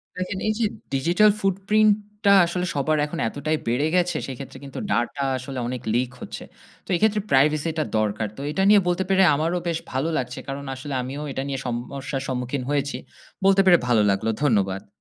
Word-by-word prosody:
দেখেন 185 +1 -3
এই 215 - +2
যে - - +1 0.3
digital 170 +10 +4
footprint 200 +3 +3 0.3
টা 200 - +7
আসলে 180 +1 -2
সবার 155 +2 +1
এখন 165 +3 -6
এতটাই 155 +6 -2
বেড়ে 125 +5 +1
গেছে 175 -2 +2
সেক্ষেত্রে 135 0 -8
কিন্তু 135 -1 -7
data 120 +4 0 0.2
আসলে 130 0 -6
অনেক 125 -1 -4
leak 125 +1 +1
হচ্ছে। - - -7 0.4
তো - - -21
এই - - -1
ক্ষেত্রে 215 -1 +3
privacy 150 +4 +3
টা - - +2
দরকার। 110 0 0
তো - - -6
এটা 190 +5 0
নিয়ে 205 -1 +7
বলতে 180 +1 +1
পেরে 190 0 +5
আমারও 165 +4 0
বেশ 165 -1 0
ভালো 135 +5 -1
লাগছে। 125 0 -3
কারণ 140 +1 -5
আসলে 140 +2 -6
আমিও 135 +4 -5
এটা 135 - -3
নিয়ে 135 -1 -3
সমস্যা 135 +3 -4
সম্মুখীন 125 +1 -2
হয়েছি। 145 -1 0 0.5
বলতে 195 0 +6
পেরে 180 -2 +7
ভালো 120 -3 +4
লাগল। 100 +3 -1 0.2
ধন্যবাদ। 100 -8 +1
140 Hz, 190 wpm, -24 LUFS, 130-180 Hz, 0.5 s, টা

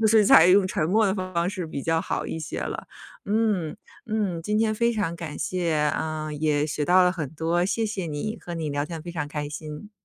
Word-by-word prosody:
就 220 - +4
是 215 -1 +5
采 160 -3 +8
用 190 +1 +6
沉 155 -4 -1
默 220 +4 +4
的 190 - +1
方 185 -2 -1
式 185 -5 -4
比 140 -3 -5
较 165 0 +1
好 - - -3
一 - - -4
些 155 -1 -5
了。 - - -4 0.4
嗯， 205 -5 0 0.3
嗯， 205 -6 -1
今 210 +4 0
天 220 -1 +2
非 235 +2 +2
常 205 -6 -1
感 165 -3 -6
谢， 175 -3 -1
啊， 155 +1 -1
也 150 0 +1
学 150 -1 -2
到 180 +2 +5
了 180 0 +4
很 155 -7 -4
多， 165 +3 0
谢 225 +3 0
谢 200 -5 -3
你， 160 +9 -4
和 175 - -6
你 160 -3 -3
聊 145 +1 -1
天 165 -2 -6
非 175 - -7
常 150 -3 -3
开 150 -1 -3
心。 155 +6 -8
170 Hz, 245 characters per minute, -25 LUFS, 155-200 Hz, 0.4 s, 采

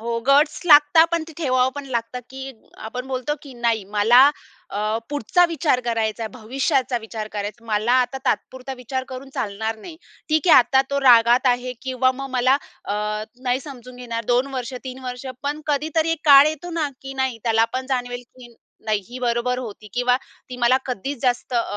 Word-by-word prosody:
हो. 230 +1 -2
गट्स 285 +3 +4
लागतात 300 +1 +7
पण 335 - +1
ते - - -11
ठेवावं 255 -4 +2
पण 285 - -6
लागतं, 235 0 -3
की 265 0 -7 0.4
आपण 250 +2 -6
बोलतो, 260 +2 -2
की 280 - -11
नाही 230 -3 0
मला 240 +7 +6 0.4
अ, 215 +2 -1
पुढचा 290 - +2
विचार 305 -6 +1
करायचा 225 -1 -1
आहे, 220 - -3
भविष्याचा 255 +2 -1
विचार 220 -1 -6
करायचा 210 +2 -6
आहे. - - -17
मला 215 +2 +1
आता 255 +2 -2
तात्पुरता 260 +1 -2
विचार 260 +1 -4
करून 260 +1 -8
चालणार 220 +2 -3
नाही. 315 +9 -11 0.3
ठीक 310 +2 +1
आहे - - +9
आता 265 +2 +5
तो 280 0 0
रागात 240 0 +5
आहे. 250 0 +1
किंवा 255 0 +1
मग 275 +1 -6
मला 255 +1 +3 0.3
अ, - - -3 0.5
नाही 255 0 0
समजून 255 -3 -11
घेणार 230 -2 -5
2 245 +3 +2
वर्ष 255 0 -4
3 260 0 -7
वर्ष 250 +1 -6 0.2
पण 290 +2 -3
कधीतरी 310 +2 0
एक 330 -2 -1
काळ 280 -1 +8
येतो 315 +3 -6
ना, 325 -3 -1
की 270 0 -7
नाही, 265 -3 -1
त्याला 225 -1 +3
पण 260 0 -3
जाणवेल, 245 -2 -2
की 245 -1 -16 0.3
नाही, 215 -1 0
ही 245 +1 -8
बरोबर 245 0 0
होती 215 -4 -8
किंवा 245 +1 +2 0.3
ती 250 - -6
मला 245 +1 +3
कधीचं 255 +2 -4
जास्त 245 +1 -1
अ, 235 - +3
255 Hz, 190 wpm, -22 LUFS, 235-275 Hz, 0.5 s, आहे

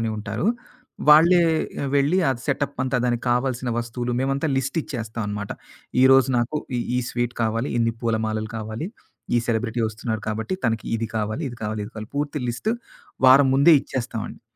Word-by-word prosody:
అని 115 -1 -1
ఉంటారు. 110 - -3 0.6
వాళ్ళే 170 +4 +7 0.5
వెళ్ళి 145 +6 +3
అది 120 - -3
సెటప్ 140 0 -1
అంతా 130 -1 0
దానికి 120 -1 0
కావాల్సిన 125 0 0
వస్తువులు 120 +1 -3
మేమంతా 135 +3 0
లిస్ట్ 135 +4 -1
ఇచ్చేస్తాం 115 -3 -5
అనమాట. 105 -1 -4 0.5
ఈ - - +6
రోజు 135 -1 +6
నాకు 120 +6 -1 0.2
ఈ - - 0 0.2
ఈ - - +2
స్వీటు 120 0 -2
కావాలి, 115 +4 0
ఇన్ని 115 0 +2
పూలమాలలు 110 -1 -1
కావాలి. 110 - -4 0.5
ఈ - - +5
సెలబ్రిటీ 115 0 -1
వస్తున్నారు 110 0 -4
కాబట్టి 110 - -2
తనకి 110 -1 -1
ఇది 115 0 -3
కావాలి, 110 +8 -2
ఇది 120 - -9
కావాలి, 105 0 -2
ఇది 105 - -9
కావాలి, 110 +2 -8
పూర్తి 145 0 -1
లిస్టు 125 - -1 0.6
వారం 135 +1 +7
ముందే 140 +5 +6
ఇచ్చేస్తామండి. 120 -4 -5
120 Hz, 165 wpm, -23 LUFS, 110-135 Hz, 0.6 s, వాళ్ళే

